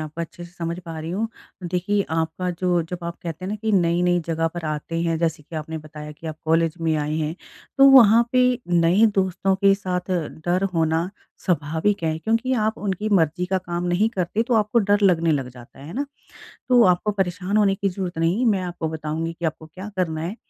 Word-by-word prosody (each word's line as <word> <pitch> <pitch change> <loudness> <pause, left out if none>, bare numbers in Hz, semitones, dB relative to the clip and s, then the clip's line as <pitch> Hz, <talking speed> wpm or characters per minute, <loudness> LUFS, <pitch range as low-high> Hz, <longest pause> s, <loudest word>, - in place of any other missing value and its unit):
आपको 155 +2 -6
अच्छे 175 +1 -7
से 175 - -13
समझ 170 0 -4
पा 165 -1 -6
रही 160 +2 -5
हूँ। 220 +5 -1 0.3
देखिए 185 +3 0
आपका 165 +3 -1
जो 175 -1 0
जब 175 +2 -6
आप 170 0 -4
कहते 170 +2 -6
हैं - - -3
ना 215 - -2
कि 220 +1 -2
नई-नई 175 -1 +3
जगह 165 0 0
पर 170 0 -7
आते 155 +2 -3
हैं, 165 -1 0
जैसे 165 -2 -1
कि 160 +2 -9
आपने 160 +1 -5
बताया 150 0 -9
कि 160 +2 -11
आप 155 -1 -5
कॉलेज 165 0 +2
में 160 -1 +1
आए 150 +1 -1
हैं, 155 +1 -2 0.4
तो 275 0 +9
वहाँ 235 -3 +8
पे 255 0 +5 0.2
नए 175 +5 +4
दोस्तों 190 0 +1
के 195 0 +4
साथ 185 -1 -4 0.4
डर 180 +2 +2
होना, 165 +2 +1 0.4
स्वाभाविक 165 +3 0
है 160 0 0
क्योंकि 230 +7 0
आप 220 - -2
उनकी 205 +1 -2
मर्ज़ी 180 -2 +2
का 190 0 0
काम 175 -1 -4
नहीं 185 +6 +2
करते, 190 +4 0
तो 240 0 0
आपको 215 +2 +2
डर 205 -1 +2
लगने 165 -4 +4
लग 135 -3 -1
जाता 125 +1 -15
है, 140 - -11
है 165 - -8
ना। 280 +2 -2 0.6
तो 245 -2 +6
आपको 180 +3 +3
परेशान 190 +1 -1
होने 200 -2 +4
की 195 0 -1
ज़रूरत 180 -2 -4
नहीं 165 +6 +1
है, 255 - +1
मैं 195 -3 0
आपको 175 -2 -4
बताऊँगी 160 +1 -3
कि 170 0 -9
आपको 160 0 -4
क्या 185 +6 -9
करना 160 -4 -1
है? 185 +7 -4
175 Hz, 220 wpm, -23 LUFS, 160-195 Hz, 0.6 s, तो